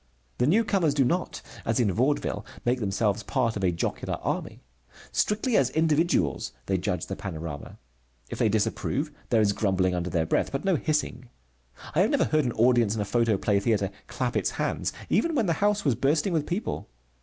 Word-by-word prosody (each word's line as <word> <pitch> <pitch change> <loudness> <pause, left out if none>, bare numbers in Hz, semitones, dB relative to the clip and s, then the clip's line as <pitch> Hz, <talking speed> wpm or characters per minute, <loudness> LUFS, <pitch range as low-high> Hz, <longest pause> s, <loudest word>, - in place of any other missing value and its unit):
The 125 - +3
newcomers 195 -5 +2
do 135 -3 +3
not, 175 +7 -1 0.2
as 115 +1 0
in 110 -5 +3
Vaudeville, 130 +9 0 0.2
make 125 +1 +2
themselves 105 0 0
part 120 -2 0
of 100 - -3
a 90 - +3
jocular 85 - -2
army. - - -3 0.5
Strictly 215 +3 +1
as 130 -2 +4
individuals 155 - +1
they 95 -1 0
judge 90 -2 -2
the 95 - -5
panorama. 80 -7 -6 0.5
If - - -7
they 110 - +3
disapprove, 130 +7 -1 0.2
there 115 -2 +4
is 100 -1 +3
grumbling 95 -3 +1
under 90 0 -2
their 85 -2 0
breath, - - 0
but 135 +5 -3
no 190 -2 +3
hissing. 150 -5 -2 0.6
I - - +1
have - - +3
never - - +2
heard 155 -2 +1
an 120 - -1
audience 115 -2 +3
in 110 - -1
a - - -1
photoplay 105 -2 +2
theatre 100 -2 0 0.2
clap 125 -1 -2
its - - +1
hands - - -1 0.2
even 335 -1 +1
when 235 - +2
the 170 - +2
house 205 -1 +2
was 140 - +4
bursting 150 - +1
with 155 -3 0
people. 180 - -3
120 Hz, 190 wpm, -27 LUFS, 100-155 Hz, 0.6 s, as